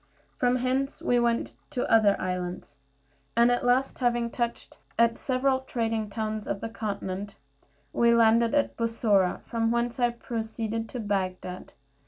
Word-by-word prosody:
From 245 0 +2
hence 260 +2 -1
we 245 - +2
went 235 -1 0 0.2
to 255 -4 -2
other 215 -3 +4
islands, 180 -5 -4 0.6
and 235 +1 +6
at 245 - +1
last, 250 +2 +2
having 240 -2 +1
touched 235 -1 -4 0.2
at 235 0 +3
several 260 0 +1
trading 225 -4 -2
towns 215 0 -3
of 200 - -2
the 225 - -5
continent, 200 -2 -4 0.6
we 235 0 +4
landed 230 +1 +4
at 290 - +1
Bussorah, 220 -5 +1
from 225 -1 -1
whence 235 +1 -1
I 240 -1 +4
proceeded 225 -1 -4
to 250 - -5
Bagdad. 185 -3 -3
230 Hz, 145 wpm, -27 LUFS, 210-245 Hz, 0.6 s, and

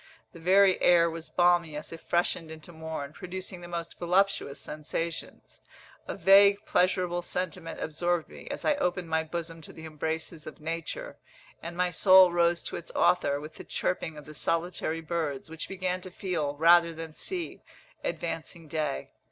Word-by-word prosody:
The 170 - -11
very 190 +2 +5
air 170 -1 +5
was 165 0 -7
balmy 175 -3 +3
as 150 - -7
it 165 - -9
freshened 170 -1 0
into 160 +2 -10
morn, 160 -3 -6
producing 185 +1 -7
the 175 - -8
most 170 -1 -6
voluptuous 180 -5 +1
sensations. 155 +2 -5 0.5
A - - -3
vague 200 +1 +6
pleasurable 180 -1 +2
sentiment 180 -1 -4
absorbed 175 +1 -1
me, - - -12
as - - -5
I - - +5
opened 180 - -1
my 160 0 +1
bosom 165 0 -5
to - - -10
the 160 - -10
embraces 160 +1 -4
of 155 - -9
nature; 165 - -5 0.4
and 170 +1 -6
my 180 0 +1
soul 185 +1 +7
rose 170 0 +2
to - - -4
its 170 - -9
Author, 175 -5 +3
with 150 +2 -9
the - - -10
chirping 160 -3 -2
of 150 - -10
the 155 - -10
solitary 165 0 -1
birds, 160 -3 -3
which 160 0 -6
began 185 -1 -2
to 185 - -8
feel, 170 -6 -2
rather 170 +2 +5
than 160 -1 -7
see, 360 - -4 0.4
advancing 165 -1 -4
day. 150 -2 -2
170 Hz, 170 wpm, -29 LUFS, 160-180 Hz, 0.5 s, soul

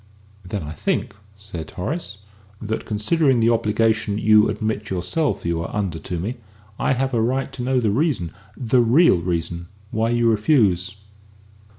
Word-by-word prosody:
"Then 95 0 -4
I 75 - -6
think," 80 - -2 0.2
said 95 -6 -8
Horace, 105 - -5 0.4
"that, 110 +1 -4
considering 130 +5 +2
the 115 +1 +4
obligation 110 -2 +1
you 110 0 +5
admit 110 -1 -3
yourself 95 - -1
you 85 -1 0
are 85 - -4
under 95 -6 -2
to 90 - -5
me, 105 +10 -3 0.4
I - - +2
have 135 +1 -1
a 115 - +2
right 130 +4 -1
to 125 - -6
know 130 +1 +1
the 110 -4 +1
reason 125 - 0 0.3
the 125 0 +2
real 120 - +5
reason 85 0 -3 0.2
why 110 +1 0
you 120 0 +2
refuse." 105 - +2
110 Hz, 160 wpm, -22 LUFS, 90-120 Hz, 0.4 s, you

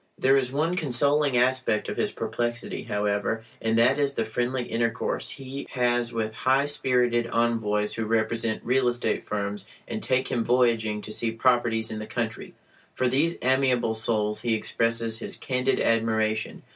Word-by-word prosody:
There 135 +1 +4
is 130 -2 +1
one 155 +6 0
consoling 145 -2 +2
aspect 125 -3 +1
of - - -3
his - - 0
perplexity, 120 0 -3
however, 105 +2 -1 0.2
and 110 0 +1
that 120 +5 +4
is 140 -1 +1
the 115 - 0
friendly 120 +3 -1
intercourse 115 0 -2
he 135 0 -7
has 120 -1 +1
with 110 -2 -2
high 130 +5 +2
spirited 125 -4 +1
envoys 110 -3 0
who 115 - -2
represent 110 0 0
real 130 +1 +2
estate 120 -2 0
firms 100 -1 -3 0.2
and 220 - -4
take 130 -5 0
him 115 - 0
voyaging 115 -3 +2
to 105 - -6
see 115 +1 +1
"properties" 115 -1 +1
in 110 - -4
the 110 - -6
country. 115 -2 -4 0.4
For 130 - +1
these 145 +7 +1
amiable 130 -3 +2
souls 110 -1 0
he 115 -2 +1
expresses 115 0 0
his - - -3
candid 130 0 0
admiration. 110 -1 0
120 Hz, 160 wpm, -26 LUFS, 110-130 Hz, 0.4 s, There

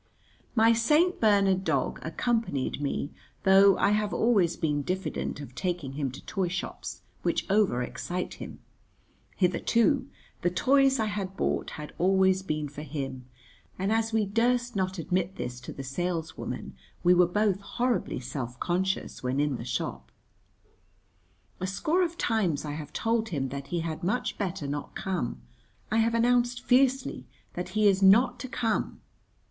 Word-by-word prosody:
My 225 0 +6
St. 300 +10 +3
Bernard 200 -3 +4
dog 140 -7 0
accompanied 165 - -1
me, 145 +1 -2 0.3
though 195 0 +6
I - - +3
have 210 0 0
always 200 -8 +3
been 150 -2 0
diffident 185 0 -3
of 140 -4 -9
taking 170 -3 -3
him 140 -1 -2
to 130 - -11
toy 190 -3 -1
shops, 185 +2 -5 0.2
which - - 0
over 195 - +3
excite 180 +8 -4
him. - - -9 0.7
Hitherto 235 - +2 0.3
the 175 - +2
toys 270 +8 +3
I 220 - +2
had 195 -2 -4
bought - - 0
had 150 -1 -8
always 190 +1 +3
been 155 -5 -2
for 145 +1 -8
him, 135 -4 -5 0.5
and 195 +3 -1
as 225 0 +1
we 220 -1 +2
durst 240 +3 +1
not 190 0 -1
admit 180 +2 -1
this 125 0 -5
to - - -8
the 135 - -7
saleswoman 165 +4 -4 0.3
we 180 0 +6
were 180 0 +5
both 200 +1 +1
horribly 240 - -1
self 125 -1 -5
conscious 190 +2 -1
when 130 +2 -1
in 145 -3 +1
the - - -6
shop. 125 - -4 1.5
A 185 - -2
score 310 - +1
of 340 -1 -1
times 190 - 0
I 150 - -3
have 150 0 -6
told 225 +6 0
him 135 -7 -2
that 140 +1 -6
he 175 -1 -2
had 160 0 -4
much 205 +8 -1
better 190 -6 -2
not 145 +1 -4
come, 170 - -3 0.5
I 220 - +2
have 230 +1 +3
announced 240 +1 +2
fiercely 260 +1 +2 0.3
that 180 +1 -4
he 215 -1 +5
is 195 -1 +3
not 235 +6 +5
to 260 - -5
come. 230 -3 -1
190 Hz, 160 wpm, -28 LUFS, 150-225 Hz, 1.5 s, My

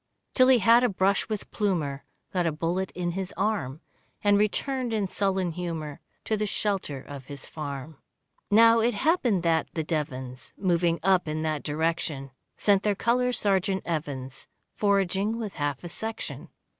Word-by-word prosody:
Till 255 -1 +5
he 260 -1 +7
had 230 +3 +5
a 250 - +4
brush 195 +1 +1
with 215 -2 -4
Plumer, 160 -10 -1 0.3
Got 180 -2 +1
a - - +2
bullet 170 +5 -1
in 175 -1 -1
his 190 +1 -4
arm, 170 -9 -1 0.4
And 205 -1 +5
returned 235 +4 0
in 205 -3 0
sullen 190 -2 0
humour 160 -4 -5 0.3
To 220 - +1
the 210 0 -1
shelter 195 -9 -1
of 140 -1 -9
his 140 -2 -8
farm. 145 -1 -6 0.5
Now 230 +2 +7
it 235 0 +2
happened 240 - +2
that 165 -1 +2
the 160 - 0
Devons, 130 -5 -4
Moving 170 -3 +1
up 190 -3 +3
in 155 +1 -2
that 155 -2 -1
direction, 150 -3 -2 0.3
Sent 200 -2 +3
their 205 0 +1
Colour 250 +4 +2
Sergeant 195 -4 +1
Evans 140 -5 -4 0.3
Foraging 200 +1 +1
with 220 -4 -4
half 145 -1 -2
a 175 - -6
section. 220 +6 -5
185 Hz, 160 wpm, -27 LUFS, 155-210 Hz, 0.5 s, he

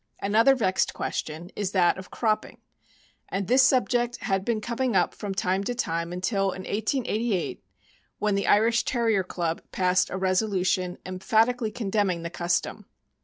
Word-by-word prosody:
Another 225 +7 +4
vexed 190 -6 0
question 160 +4 -4
is 200 -2 -3
that 185 -1 +3
of 190 - -10
cropiDing, 215 -2 -1 0.7
and 195 0 -2
this 255 +5 +5
sub 260 -1 +4
ject 240 -1 0
had 195 -1 0
been 225 +1 0
coming 240 +1 -2
up 180 - +2
from 200 -2 -5
time 190 +1 0
to 245 - -2
time 170 -7 -2
until 195 +3 -1
in 190 -1 -2
1888, 220 -2 -1 0.5
when 210 -1 0
the 200 0 0
Irish 230 +3 +4
Terrier 225 -6 +1
Club 170 -2 -3
passed 185 0 +2
a 190 - -4
resolution 185 -1 0
emphatic 220 +7 +1
ally 220 - 0
condemning 205 -6 -1
the 170 - -5
custom. 175 0 -2
200 Hz, 160 wpm, -26 LUFS, 185-230 Hz, 0.7 s, this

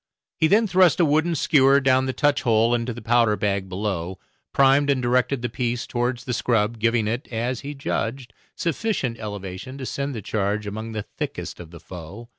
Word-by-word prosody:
He 160 - +4
then 215 +6 +4
thrust 185 -4 +4
a 170 - +5
wooden 160 +3 +2
skewer 140 -2 +4
down 130 -1 +3
the - - 0
touch 145 +2 +1
hole 115 0 +3
into 120 +1 -1
the 120 +1 -8
powder 115 -2 +3
bag 100 -2 -1
below, 95 -2 -3 0.3
primed 140 +1 +4
and 140 -2 +3
directed 125 +1 +1
the - - +1
piece 120 -1 -2
towards 120 0 -2
the 125 - -3
scrub, 115 -1 0
giving 115 -1 +2
it, 120 +4 -3
as 120 +2 -2
he 145 +1 -7
judged, 130 -2 -3 0.2
sufficient 165 - -2
elevation 105 +3 -6
to 135 - -6
send 140 +1 -3
the 110 - -5
charge 105 +1 -1
among 110 +2 -5
the 105 -1 -3 0.2
thickest - - -4
of 85 -2 -9
the 85 0 -12
foe. 95 +8 -10
120 Hz, 195 wpm, -23 LUFS, 110-135 Hz, 0.3 s, a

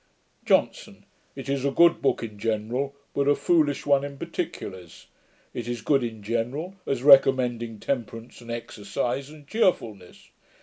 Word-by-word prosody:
JOHNSON. - - 0 0.3
'It - - -8
is 135 -1 -1
a 140 - +2
good 170 +4 +4
book 135 - +1
in 105 -3 -7
general, 115 +6 -2 0.2
but 140 0 0
a 145 - +5
foolish 150 -5 +1
one 140 -1 +3
in 140 -1 -6
particulars. 100 - -6 0.5
It 120 -1 -5
is 120 -2 -4
good 135 -3 +2
in 110 -3 -5
general, 120 - -2
as 130 -2 -1
recommending 125 -5 +5
temperance 115 -2 -4
and 120 - -13
exercise, 120 +4 -4
and 150 -2 -14
cheerfulness. 115 - -1
130 Hz, 145 wpm, -25 LUFS, 115-140 Hz, 0.5 s, a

